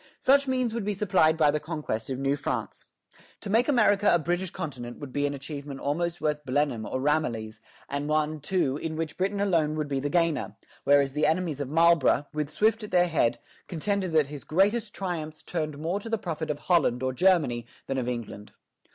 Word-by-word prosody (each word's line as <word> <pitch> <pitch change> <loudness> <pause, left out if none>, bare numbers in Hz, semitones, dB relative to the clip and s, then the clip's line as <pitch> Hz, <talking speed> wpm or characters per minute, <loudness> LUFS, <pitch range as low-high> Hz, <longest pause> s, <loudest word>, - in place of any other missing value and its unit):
Such 280 +1 +4
means 255 -3 0
would 230 -2 -2
be 205 0 -1
supplied 180 -6 +3
by 150 -2 +4
the 150 - -1
conquest 150 -9 -4
of 130 - -2
New 135 +1 +1
France. 145 - -4 0.6
To 200 - -5
make 230 +3 +3
America 210 -7 +4
a - - +5
British 175 +3 -1
continent 120 -8 -6
would 140 -3 -9
be 145 0 +1
an 145 - -3
achievement 140 0 -7
almost 170 +4 -1
worth 150 -1 -1
Blenheim 130 -5 0
or 130 - -2
Ramillies, 120 -7 -1 0.3
and 140 +1 -3
one, 155 0 0
too, 145 -3 0
in 160 +1 -4
which 160 -1 -3
Britain 195 +2 -1
alone 165 -7 +1
would 155 -1 -2
be 140 -1 -1
the 145 +2 -2
gainer; 145 - 0 0.3
whereas 140 -1 +4
the 150 +1 +2
enemies 160 -3 0
of 135 - -4
Marlborough, 165 -3 +4
with 150 -1 -2
Swift 220 +6 +1
at 210 - -6
their 180 0 +3
head, 145 -8 +2 0.3
contended 190 +2 -1
that 155 -2 +4
his 145 0 -9
greatest 210 +6 +1
triumphs 160 -5 -4
turned 155 -4 -3
more 165 +6 -2
to 225 - -8
the 225 - +1
profit 160 -5 -4
of 150 - -1
Holland 140 -8 +2
or 130 0 0
Germany 150 -8 +2 0.2
than 135 -1 -2
of 125 -1 -2
England. 115 -4 -6
155 Hz, 205 wpm, -27 LUFS, 140-180 Hz, 0.6 s, a